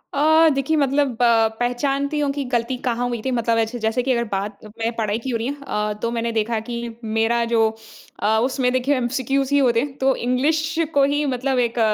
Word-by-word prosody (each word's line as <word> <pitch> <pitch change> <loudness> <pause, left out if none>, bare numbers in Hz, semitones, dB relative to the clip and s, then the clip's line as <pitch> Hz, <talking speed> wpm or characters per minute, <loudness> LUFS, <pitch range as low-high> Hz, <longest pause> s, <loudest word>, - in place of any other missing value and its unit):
अ, 315 +3 +5
देखिए 275 +3 0
मतलब 280 -2 +1
पहचानती 245 +5 +1
हूँ 290 -1 +1
कि 280 0 -3
गलती 240 +1 0
कहाँ 245 0 0
हुई 240 -2 -3
थी 260 - 0
मतलब 230 -2 +1
ऐसे 225 +2 -1
जैसे 225 +3 +1
कि 265 - 0
अगर 235 -2 +1
बात 200 +1 -3 0.2
मैं 225 +1 0
पढ़ाई 215 -2 -1
की 260 - -6
हो 240 - 0
रही 230 +2 -3
है 285 - -3
अ, 210 -3 -1
तो 230 - -1
मैंने 235 0 -2
देखा 225 0 0
कि 240 - -4 0.3
मेरा 225 +2 +1
जो 225 -1 +4 0.5
अ, 220 +1 +3
उसमें 255 -1 0
देखिए 255 +3 +1
एमसीक्यूज़ 265 +2 -1
ही 285 - +5
होते 240 -4 +3
हैं, 270 +2 -4
तो 265 -1 +2
इंग्लिश 305 +6 0 0.2
को 280 - +4
ही 290 +2 +1
मतलब 260 -1 0
एक 240 -1 0
245 Hz, 210 wpm, -21 LUFS, 230-275 Hz, 0.5 s, अ